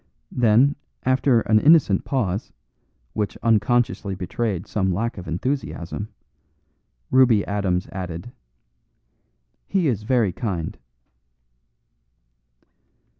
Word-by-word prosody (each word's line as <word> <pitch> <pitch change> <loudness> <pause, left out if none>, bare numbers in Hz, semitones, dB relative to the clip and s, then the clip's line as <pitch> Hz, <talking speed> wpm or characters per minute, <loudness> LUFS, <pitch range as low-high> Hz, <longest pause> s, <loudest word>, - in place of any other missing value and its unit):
Then, 125 +4 +3 0.3
after 130 -2 +3
an 110 -1 +3
innocent 145 - +4
pause, 105 -7 -2 0.6
which 105 -2 -2
unconsciously 115 -3 +1
betrayed 95 +1 -3
some 95 -3 -1
lack 110 +3 -2
of 90 - -9
enthusiasm, 100 - -3 1.0
Ruby 125 -6 +5
Adams 95 -3 -1
added: 90 +3 -6 1.4
"He 190 -5 +1
is 115 -7 0
very 115 -3 +1
kind." 95 -9 -3
110 Hz, 85 wpm, -23 LUFS, 95-125 Hz, 1.4 s, Ruby